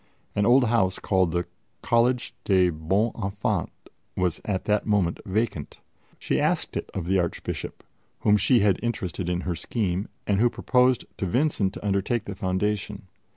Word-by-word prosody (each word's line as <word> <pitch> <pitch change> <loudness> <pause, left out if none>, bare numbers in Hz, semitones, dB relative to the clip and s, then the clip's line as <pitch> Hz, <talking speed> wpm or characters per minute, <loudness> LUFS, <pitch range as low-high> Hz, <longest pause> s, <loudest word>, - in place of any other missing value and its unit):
An 105 0 +2
old 125 +2 +6
house 110 -6 +2
called 95 -4 +1
the 85 +1 -1 0.4
Collège 120 +1 +2
des 95 -3 +3
Bons 95 +9 0
Enfants 100 +1 -1 0.5
was 90 -3 0
at 95 -3 -2
that 105 0 +1
moment 100 -5 +1
vacant. 95 -7 -2 0.4
She - - -1
asked - - 0
it - - -3
of 90 - -3
the 95 +2 +2
Archbishop, 85 -2 -4 0.4
whom 105 - +4
she 120 +2 +4
had 100 -2 +3
interested 95 -7 -3
in 90 0 -1
her 90 - -2
scheme, 95 +2 -2 0.2
and 100 -1 +1
who 120 +2 +4
proposed 125 0 +2
to 95 - -1
Vincent 115 - +1
to - - -8
undertake 105 +3 0
the 100 - -5
foundation. 100 +1 -2
100 Hz, 160 wpm, -25 LUFS, 90-115 Hz, 0.5 s, old